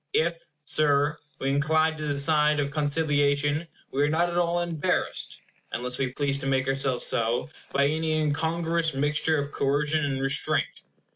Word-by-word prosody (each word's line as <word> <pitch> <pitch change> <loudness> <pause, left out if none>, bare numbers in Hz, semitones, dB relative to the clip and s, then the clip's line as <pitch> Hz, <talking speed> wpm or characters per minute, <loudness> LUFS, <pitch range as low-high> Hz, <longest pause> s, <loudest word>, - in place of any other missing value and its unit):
If, 170 +1 0 0.2
Sir, 145 0 +2 0.2
we 135 - -1
incline 155 +3 +2
to 155 0 -4
the 145 -1 -1
side 150 +1 +3
of 140 -1 -1
conciliation, 145 0 +1 0.2
we 140 - -1
are 145 - +3
not 170 +3 +1
at - - -5
all 175 0 +1
embarrassed 170 -3 -1 0.3
(unless 125 +1 -2
we 135 - +1
please 140 0 -1
to 135 - -4
make 135 -1 0
ourselves 135 -2 +1
so) 115 +6 0 0.2
by 140 0 +2
any 155 +2 0
incongruous 160 +1 0
mixture 150 +3 +1
of 145 0 -3
coercion 150 +3 0
and 135 -2 -1
restraint. 135 0 +1
145 Hz, 160 wpm, -26 LUFS, 140-160 Hz, 0.3 s, side